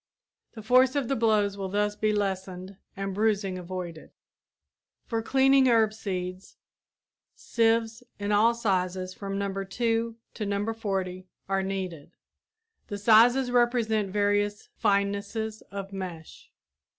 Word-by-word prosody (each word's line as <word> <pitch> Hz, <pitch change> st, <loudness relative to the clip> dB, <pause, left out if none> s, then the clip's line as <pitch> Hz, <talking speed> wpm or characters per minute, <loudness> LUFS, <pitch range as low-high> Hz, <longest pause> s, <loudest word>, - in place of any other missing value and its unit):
The 220 Hz, -, -9 dB
force 255 Hz, +4 st, +4 dB
of 275 Hz, -4 st, -1 dB
the 275 Hz, -, +1 dB
blows 215 Hz, -3 st, +2 dB
will 190 Hz, -1 st, -3 dB
thus 205 Hz, +1 st, 0 dB
be 215 Hz, 0 st, +1 dB
lessened 190 Hz, -2 st, -3 dB, 0.2 s
and 195 Hz, 0 st, -3 dB
bruising 200 Hz, -2 st, 0 dB
avoided. 175 Hz, -2 st, -7 dB, 1.0 s
For 225 Hz, -1 st, -2 dB
cleaning 270 Hz, +2 st, +4 dB
herb 225 Hz, -3 st, +4 dB
seeds 185 Hz, -3 st, -5 dB, 0.8 s
sieves 225 Hz, 0 st, +1 dB, 0.2 s
in 205 Hz, 0 st, -3 dB
all 220 Hz, +3 st, +4 dB
sizes 185 Hz, -4 st, -1 dB
from 195 Hz, 0 st, -5 dB
No. 195 Hz, -1 st, -2 dB
2 230 Hz, +3 st, -1 dB, 0.2 s
to 215 Hz, -, -4 dB
No. 205 Hz, +2 st, -1 dB
40 190 Hz, -4 st, -3 dB, 0.2 s
are 195 Hz, 0 st, +1 dB
needed. 190 Hz, -5 st, -5 dB, 0.7 s
The 205 Hz, -, -4 dB
sizes 240 Hz, +5 st, +5 dB
represent 235 Hz, -4 st, +2 dB
various 205 Hz, +1 st, 0 dB
finenesses 200 Hz, +2 st, -1 dB
of 195 Hz, 0 st, -7 dB
mesh. 180 Hz, -4 st, -8 dB
205 Hz, 125 wpm, -27 LUFS, 195-225 Hz, 1.0 s, sizes